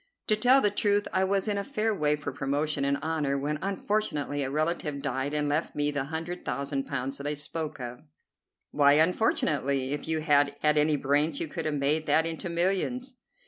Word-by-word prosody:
To 215 Hz, -, +5 dB
tell 250 Hz, +5 st, +5 dB
the 205 Hz, -, +3 dB
truth, 205 Hz, 0 st, +1 dB
I 190 Hz, -, +3 dB
was 195 Hz, +1 st, +1 dB
in 205 Hz, -1 st, 0 dB
a -, -, -2 dB
fair 225 Hz, -3 st, -1 dB
way 150 Hz, -6 st, +1 dB
for 145 Hz, -1 st, -5 dB
promotion 145 Hz, +2 st, -1 dB
and 140 Hz, 0 st, +1 dB
honor 155 Hz, -3 st, 0 dB
when 150 Hz, +2 st, -2 dB
unfortunately 190 Hz, -7 st, -1 dB
a 135 Hz, -, -1 dB
relative 155 Hz, 0 st, -1 dB
died 135 Hz, 0 st, -2 dB
and 150 Hz, -1 st, 0 dB
left 150 Hz, +3 st, -1 dB
me 145 Hz, 0 st, 0 dB
the 145 Hz, -2 st, -2 dB
hundred 165 Hz, +4 st, -5 dB
thousand 140 Hz, +1 st, -2 dB
pounds 135 Hz, 0 st, -3 dB
that 140 Hz, -, -4 dB
I 150 Hz, -, -1 dB
spoke 150 Hz, +1 st, -5 dB
of." 125 Hz, 0 st, -6 dB, 0.7 s
"Why 145 Hz, -1 st, +5 dB
unfortunately? 145 Hz, -5 st, +1 dB
If 145 Hz, -, -4 dB
you 160 Hz, -1 st, 0 dB
had 145 Hz, -2 st, +3 dB
had 150 Hz, 0 st, +3 dB
any 150 Hz, 0 st, +3 dB
brains 145 Hz, +2 st, +1 dB
you -, -, -2 dB
could -, -, -5 dB
have 155 Hz, -1 st, 0 dB
made 145 Hz, +3 st, 0 dB
that 160 Hz, -, +3 dB
into 165 Hz, +2 st, -4 dB
millions." 195 Hz, +10 st, -1 dB
150 Hz, 200 wpm, -28 LUFS, 140-175 Hz, 0.7 s, To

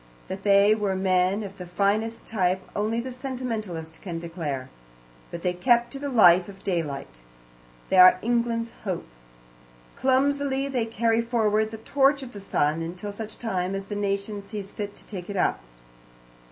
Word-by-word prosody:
That 190 Hz, +1 st, -5 dB
they 200 Hz, +1 st, +5 dB
were 205 Hz, -3 st, 0 dB
men 190 Hz, +2 st, +2 dB
of 195 Hz, -1 st, -9 dB
the 180 Hz, -, -7 dB
finest 210 Hz, +5 st, 0 dB
type 185 Hz, -3 st, 0 dB
only 215 Hz, +3 st, 0 dB
the 255 Hz, +2 st, -4 dB
sentimentalist 225 Hz, -, -5 dB
can 175 Hz, -4 st, -5 dB
declare. 165 Hz, -6 st, -4 dB, 0.6 s
But 170 Hz, -, -7 dB
they 180 Hz, -, +1 dB
kept 240 Hz, +5 st, +3 dB
to 275 Hz, -, -7 dB
the 285 Hz, 0 st, -3 dB
life 185 Hz, -7 st, +6 dB
of 195 Hz, -1 st, -13 dB
daylight. 150 Hz, -, -3 dB, 0.7 s
They 190 Hz, -, +2 dB
are 185 Hz, 0 st, +9 dB
England's 235 Hz, 0 st, 0 dB
hope. 185 Hz, -5 st, -3 dB, 0.9 s
Clumsily 275 Hz, +1 st, +1 dB
they 250 Hz, -5 st, -1 dB
carry 230 Hz, 0 st, +1 dB
forward 220 Hz, -2 st, +1 dB
the 220 Hz, -, -7 dB
torch 275 Hz, +4 st, +2 dB
of 250 Hz, -, -8 dB
the 205 Hz, -, -8 dB
sun, 155 Hz, -4 st, 0 dB
until 180 Hz, +5 st, -5 dB
such 215 Hz, +1 st, -7 dB
time 190 Hz, -4 st, -2 dB
as 195 Hz, 0 st, -4 dB
the 205 Hz, -, -5 dB
nation 200 Hz, 0 st, -2 dB
sees 200 Hz, -1 st, -7 dB
fit 205 Hz, -1 st, -5 dB
to -, -, -12 dB
take 185 Hz, -3 st, -7 dB
it 200 Hz, -, -3 dB
up. -, -, +1 dB
205 Hz, 165 wpm, -26 LUFS, 185-230 Hz, 0.9 s, are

